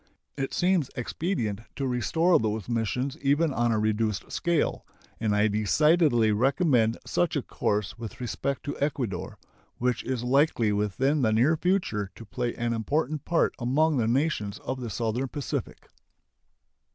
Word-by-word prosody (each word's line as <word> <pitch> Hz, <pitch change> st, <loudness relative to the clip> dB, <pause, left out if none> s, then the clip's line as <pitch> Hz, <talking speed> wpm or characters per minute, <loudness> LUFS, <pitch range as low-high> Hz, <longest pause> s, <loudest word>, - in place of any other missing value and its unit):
It 135 Hz, -1 st, -3 dB
seems 175 Hz, -6 st, +1 dB
expedient 120 Hz, -, -2 dB
to 140 Hz, -, -2 dB
restore 160 Hz, +8 st, +2 dB
those 110 Hz, -1 st, -2 dB
missions, 125 Hz, +4 st, -1 dB
even 145 Hz, +2 st, +2 dB
on 120 Hz, -1 st, +1 dB
a 110 Hz, -, +2 dB
reduced 105 Hz, -1 st, -1 dB
scale, 170 Hz, -3 st, 0 dB, 0.4 s
and 110 Hz, -2 st, +1 dB
I 105 Hz, +1 st, +4 dB
decidedly 120 Hz, -, +3 dB
recommend 125 Hz, -, +2 dB
such -, -, 0 dB
a -, -, 0 dB
course 105 Hz, +2 st, -2 dB
with 115 Hz, -5 st, -7 dB
respect 130 Hz, +3 st, -3 dB
to 145 Hz, -, -4 dB
Ecuador, 130 Hz, -10 st, -2 dB, 0.4 s
which 125 Hz, -1 st, 0 dB
is 130 Hz, -2 st, -2 dB
likely 125 Hz, -4 st, +2 dB
within 105 Hz, +9 st, +1 dB
the 110 Hz, -3 st, +3 dB
near 125 Hz, +9 st, +4 dB
future 175 Hz, -, 0 dB
to 115 Hz, -, -11 dB
play 120 Hz, +2 st, -3 dB
an 120 Hz, 0 st, -1 dB
important 145 Hz, +5 st, -1 dB
part 170 Hz, -, +2 dB
among 145 Hz, +5 st, +2 dB
the 115 Hz, -3 st, +1 dB
nations 120 Hz, -5 st, 0 dB
of 130 Hz, 0 st, -4 dB
the 120 Hz, -, -4 dB
Southern 115 Hz, +5 st, -1 dB
Pacific. 140 Hz, +2 st, -5 dB
125 Hz, 150 wpm, -27 LUFS, 110-145 Hz, 0.4 s, I